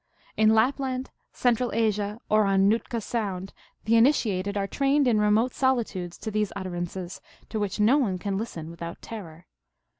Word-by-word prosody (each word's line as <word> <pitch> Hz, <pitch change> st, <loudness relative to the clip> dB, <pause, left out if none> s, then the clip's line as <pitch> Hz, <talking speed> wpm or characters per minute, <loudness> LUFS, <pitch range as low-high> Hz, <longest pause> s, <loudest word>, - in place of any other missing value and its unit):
In 220 Hz, 0 st, +4 dB
Lapland, 260 Hz, +2 st, 0 dB, 0.2 s
Central 245 Hz, 0 st, +1 dB
Asia, 210 Hz, -1 st, 0 dB
or 215 Hz, 0 st, +3 dB
on 195 Hz, 0 st, +3 dB
Nootka 225 Hz, +2 st, 0 dB
Sound 195 Hz, -4 st, -3 dB, 0.3 s
the 225 Hz, +2 st, +3 dB
in 230 Hz, -, +7 dB
itiated 200 Hz, -8 st, 0 dB
are 200 Hz, -, 0 dB
trained 275 Hz, +5 st, +2 dB
in 220 Hz, -3 st, +3 dB
remote 215 Hz, +4 st, +3 dB
solitudes 220 Hz, -10 st, -1 dB
to 220 Hz, -, -5 dB
these 210 Hz, -1 st, 0 dB
utter 185 Hz, -2 st, -4 dB
ances, 175 Hz, +1 st, -5 dB, 0.3 s
to 220 Hz, -, -3 dB
which 205 Hz, -1 st, -2 dB
no 235 Hz, +8 st, +5 dB
one 200 Hz, -9 st, 0 dB
can 195 Hz, +1 st, -3 dB
listen 170 Hz, -7 st, -5 dB
without 170 Hz, 0 st, -7 dB
terror. 175 Hz, -7 st, -9 dB
210 Hz, 170 wpm, -26 LUFS, 190-235 Hz, 0.3 s, in